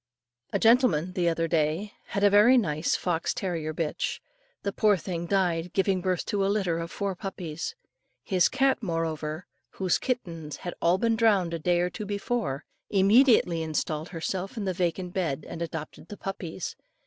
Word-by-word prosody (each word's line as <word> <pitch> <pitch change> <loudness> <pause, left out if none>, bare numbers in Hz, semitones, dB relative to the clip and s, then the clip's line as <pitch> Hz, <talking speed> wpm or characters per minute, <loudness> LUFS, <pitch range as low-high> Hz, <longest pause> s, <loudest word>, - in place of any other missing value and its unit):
A - - +1
gentleman, 220 - +4
the 175 -2 +2
other 165 0 0
day, 165 +5 0
had 200 - -2
a 205 - +7
very 215 +6 +7
nice 155 -8 +1
fox 175 -2 -1
terrier 165 -5 -2
bitch. 155 -1 -2 0.4
The 200 - -2
poor 210 -2 +4
thing 170 0 -4
died 175 -3 0
giving 190 -1 +2
birth 185 -1 -1
to 200 -1 0
a - - +2
litter 190 -5 0
of 170 0 -4
four 200 +1 -2
puppies. 180 - -5 0.5
His 185 -4 +3
cat, 270 0 +2
however, 165 -3 -2 0.3
whose 185 -2 +1
kittens 170 - -3
had 175 - -6
been - - -14
all 170 +2 +4
drowned 220 -5 +2
a 165 - -2
day 175 +2 +2
or 180 0 0
too 210 - -6
before, 205 - -2 0.2
immediately 200 -3 +5
installed 155 0 -2
herself 185 +4 -4
in 210 - -2
the 190 - 0
vacant 180 0 -2
bed 155 -6 -2
and 165 - -7
adopted 160 -1 -6
the 205 - -9
puppies. 185 -3 -5
180 Hz, 170 wpm, -27 LUFS, 165-200 Hz, 0.5 s, a